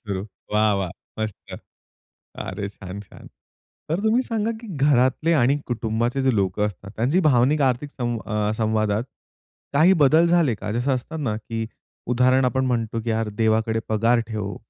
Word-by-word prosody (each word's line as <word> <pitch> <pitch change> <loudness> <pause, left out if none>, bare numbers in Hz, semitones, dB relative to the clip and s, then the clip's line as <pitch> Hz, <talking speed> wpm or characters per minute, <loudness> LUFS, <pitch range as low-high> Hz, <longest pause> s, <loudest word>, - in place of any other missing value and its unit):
सुरू. 100 -2 -4 0.3
वाह! 105 0 +3
वाह! 95 -3 -2 0.3
मस्त. 110 -2 -6 0.8
अरे! 100 +2 -4
छान-छान. 100 0 -10 0.6
तर 165 +5 0
तुम्ही 225 +3 +3
सांगा, 225 -3 -1
की 230 - -10
घरातले 140 +3 +3
आणि 140 -2 +3
कुटुंबाचे 120 +2 -1
जे 130 -2 +2
लोकं 100 +1 +1
असतात, 100 -1 -8
त्यांची 135 +11 +2
भावनिक, 145 -1 +3
आर्थिक 130 +2 0
संव 120 -4 -3
अ, 105 -1 0
संवादात 110 0 0 0.7
काही 160 +6 +5
बदल 155 +5 +5
झाले 170 -8 +3
का? 105 0 -5
जसं 125 +4 +1
असतं 150 +5 -5
ना, 110 -3 -1
की 115 0 -4 0.5
उदाहरण 130 +2 +3
आपण 130 +1 +1
म्हणतो, 115 -2 -1
की 115 - -1
यार 110 0 0
देवाकडे 110 0 +2
पगार 115 +2 +3
ठेव, 105 -2 -4
120 Hz, 155 wpm, -23 LUFS, 110-135 Hz, 0.8 s, काही